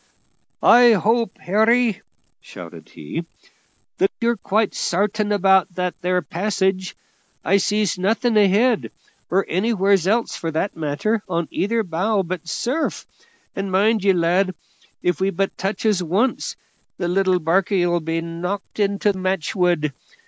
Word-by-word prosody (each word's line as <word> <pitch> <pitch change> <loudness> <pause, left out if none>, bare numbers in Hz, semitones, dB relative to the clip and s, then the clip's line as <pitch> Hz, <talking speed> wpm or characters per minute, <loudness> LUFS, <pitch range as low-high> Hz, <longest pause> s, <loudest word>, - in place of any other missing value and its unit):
"I 240 0 +7
hope, 225 +1 +1
Harry," 220 +2 +2 0.4
shouted - - -12
he, 120 - -6 0.8
"that 385 +2 +3
you're 235 0 +1
quite 210 +1 0
sartain 205 +3 -1
about 190 -2 +3
that 180 -1 -1
there 180 0 0
passage. 190 +2 -1 0.5
I 195 +4 +4
sees 205 -1 0
nothing 225 +5 +1
ahead, 210 +3 +3 0.4
or 195 +2 +1
anywheres 195 -1 +1
else 230 +3 +1
for 165 - -4
that 160 +5 -2
matter, 160 +9 -1
on 170 -2 -1
either 225 +3 0
bow 190 +3 0
but 170 -1 -6
surf; 255 - -2 0.5
and 195 -1 -3
mind 210 +2 +2
ye, 200 - +5
lad, 180 +1 +1 0.5
if 180 -2 0
we 190 - +2
but 195 +1 -2
touches 195 0 -1
once, 195 +10 -1 0.4
the 175 - -2
little 185 +1 +2
barkie 180 +3 +1
'll 175 0 +1
be 165 +1 -2
knocked 180 +6 -5
into 200 0 +1
match 185 0 -2
wood. 175 -6 +1
195 Hz, 135 wpm, -21 LUFS, 175-215 Hz, 0.8 s, I